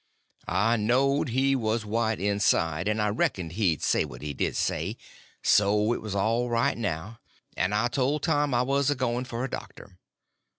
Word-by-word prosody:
I 115 +5 +2
knowed 130 +6 +2
he 135 +3 +2
was 110 -2 -1
white 110 0 0
inside, 95 -4 +1
and 105 +1 0
I 105 0 +1
reckoned 95 -5 -1
he'd 90 -4 0
say - - +2
what - - -9
he 75 -1 -4
did - - -2
say—so 105 +2 0
it - - -4
was 105 -2 -5
all 115 +5 +1
right 115 0 +1
now, 105 +1 -4 0.4
and 100 +3 0
I 110 +3 +2
told 140 +4 -1
Tom 145 -3 +1
I 120 - +3
was 140 +1 +1
a 145 - +1
going 125 -1 -1
for 120 -1 -4
a - - -1
doctor. 95 -2 -9
115 Hz, 175 wpm, -27 LUFS, 100-125 Hz, 0.4 s, I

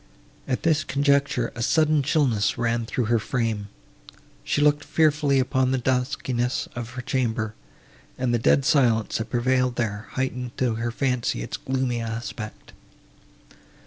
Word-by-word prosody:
At 130 -2 -2
this 155 -2 +3
conjecture, 140 -3 +1
a 120 - -6
sudden 155 +3 +3
chillness 130 - +1
ran 115 -1 0
through 125 - -1
her 115 +1 +2
frame; 110 -3 -2 0.8
she - - 0
looked 145 0 +3
fearfully 150 -3 +2
upon 130 0 +2
the 130 - +1
duskiness 125 -1 -1
of 120 -1 -5
her 125 -1 -6
chamber, 115 -4 -1 0.6
and 125 -2 0
the 120 - +2
dead 135 +4 +3
silence, 120 -9 +2
that 110 +1 -4
prevailed 125 +1 +1
there, 105 -3 -2
heightened 125 -2 -3
to 125 -3 +1
her 115 +1 -2
fancy 125 - -1
its - - -5
gloomy 130 -2 -1
aspect. 115 -1 -6
125 Hz, 145 wpm, -24 LUFS, 115-135 Hz, 0.8 s, this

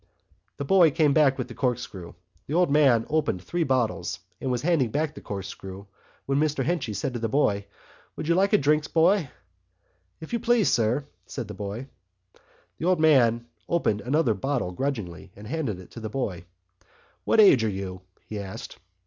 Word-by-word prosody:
The 140 - -4
boy 180 +1 +6
came 150 -1 +2
back 140 -3 +4
with 125 -2 -3
the 120 - -9
corkscrew. 110 -9 -3 0.3
The 150 - -2
old 175 -4 +3
man 135 -6 +4
opened 150 - 0
three 175 - -1
bottles 125 - 0 0.2
and 130 - -2
was 125 -1 -1
handing 155 -8 +2
back 150 +5 -1
the - - -11
corkscrew 95 0 -7 0.4
when 135 +1 +1
Mr 150 -3 +1
Henchy 165 -9 -1
said 125 - -2
to 120 - -3
the 115 0 -2
boy: 100 -7 +1 0.5
"Would - - -5
you 170 - +4
like 195 +3 +2
a - - +6
drink, 150 +2 +1
boy?" 170 -1 +3 0.9
"If 160 - -9
you 235 - +1
please, 235 -3 +3
sir," 120 +5 +1 0.2
said 120 -5 -5
the 105 - -7
boy. 105 +5 -5 0.9
The - - -3
old 180 -2 +3
man 120 -7 +4 0.2
opened 110 -11 +1
another 135 -1 +2
bottle 120 -1 -2
grudgingly, 100 -7 -4
and 105 - -11
handed 125 - -3
it 95 - -13
to - - -9
the 110 -1 -5
boy. 100 -8 -3 0.8
"What - - +2
age 170 - +7
are 110 - +1
you?" 95 -2 -5 0.2
he 105 - -6
asked. 95 -1 -8
130 Hz, 185 wpm, -26 LUFS, 105-155 Hz, 0.9 s, age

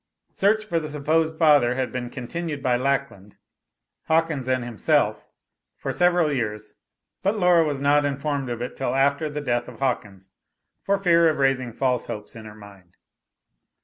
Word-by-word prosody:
Search 215 +2 +1
for 170 -6 0
the 155 - -6
supposed 155 +2 0
father 145 -7 +4
had 130 0 -2
been 125 -1 -4
continued 145 +4 -5
by 125 -1 +2
Lackland, 130 -6 -2 0.7
Hawkins 160 -5 0
and 130 -1 0
himself 120 -5 0 0.5
for - - -4
several 175 -4 +2
years, 105 -4 -4 0.5
but 200 +3 0
Laura 180 -3 +4
was 145 -3 -2
not 145 +1 +3
informed 140 -1 -2
of 120 0 -4
it 125 - -6
till 135 - -2
after 140 +3 +1
the 150 0 -5
death 120 -3 -1
of - - -11
Hawkins, 100 -8 -3 0.5
for 200 0 +1
fear 170 -4 +4
of 155 - -1
raising 135 -3 +1
false 125 0 -1
hopes 105 +2 -7
in 110 -1 -10
her 105 0 -11
mind. 100 -4 -16
140 Hz, 165 wpm, -24 LUFS, 120-160 Hz, 0.7 s, father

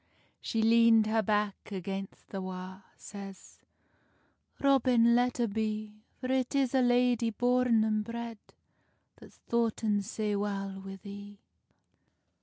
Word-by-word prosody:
She 225 -1 -1
leand 230 -1 +5
her 220 +1 +1
back 210 -1 -1
against 195 0 -6
the 195 - -5
wa, 185 0 -7 0.2
Says, 195 -2 -11 1.0
"Robin, 250 -4 +4
let 245 0 +1
a' 235 - +2
be; 215 0 -3 0.2
For 255 0 -3
it 260 +1 0
is 270 -2 +1
a 265 - +4
lady 245 -1 +3
born 245 0 +2
and 215 -1 0
bred 230 0 -6 0.8
That's - - -16
foughten 225 -3 +1
sae 210 0 -2
well 200 -1 -2
wi 195 0 -8
thee." 200 +1 -11
220 Hz, 125 wpm, -30 LUFS, 200-235 Hz, 1.0 s, leand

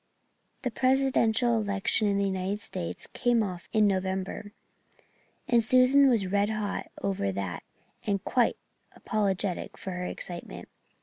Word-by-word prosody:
The 250 - -1
Presidential 250 -2 +2
election 200 +1 0
in 200 -1 +1
the 200 - +1
United 190 +1 -2
States 85 - -4
came 240 -2 +1
off 180 -4 -6
in 215 -1 +4
November, 190 +1 -1 1.0
and 235 -2 +4
Susan 255 +4 +6
was 225 -6 +3
red 200 +2 +1
hot 215 -2 -3 0.2
over 185 - 0
that 95 -2 -4 0.4
and 200 -2 -1
quite 245 -2 +2 0.4
apologetic 200 -3 -1
for 190 - -6
her 180 0 -4
excitement. - - -6
205 Hz, 130 wpm, -28 LUFS, 190-235 Hz, 1.0 s, Susan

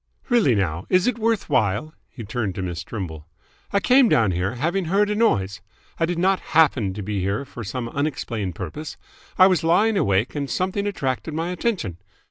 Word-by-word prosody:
"Really 225 - +4
now, 90 -3 -1
is 185 0 +3
it 250 -2 0
worth 225 -2 0
while?" 110 +8 0 0.2
He 120 - -9
turned 110 -3 -3
to 95 - -3
Miss 90 -1 -4
Trimble. 80 -7 -6 0.4
"I 200 - +3
came 250 +4 +5
down 110 -5 +3
here, 90 +6 -1
having 170 +8 -1
heard 200 +5 +2
a - - 0
noise. 105 - +1 0.4
I 165 - +2
did 175 0 -2
not 190 +2 +2 0.2
happen 130 -11 +4
to 105 - -5
be 105 0 -2
here 100 +8 -1
for 120 -3 -8
some 115 +3 -4
unexplained 115 - -3
purpose. 150 - -6 0.4
I 185 - +8
was 185 -3 +3
lying 205 +6 +3
awake 100 - +1
and 140 -2 -3
something 190 +2 -1
attracted 150 -4 -3
my 165 +2 -2
attention. 180 - -2
140 Hz, 190 wpm, -23 LUFS, -, 0.4 s, I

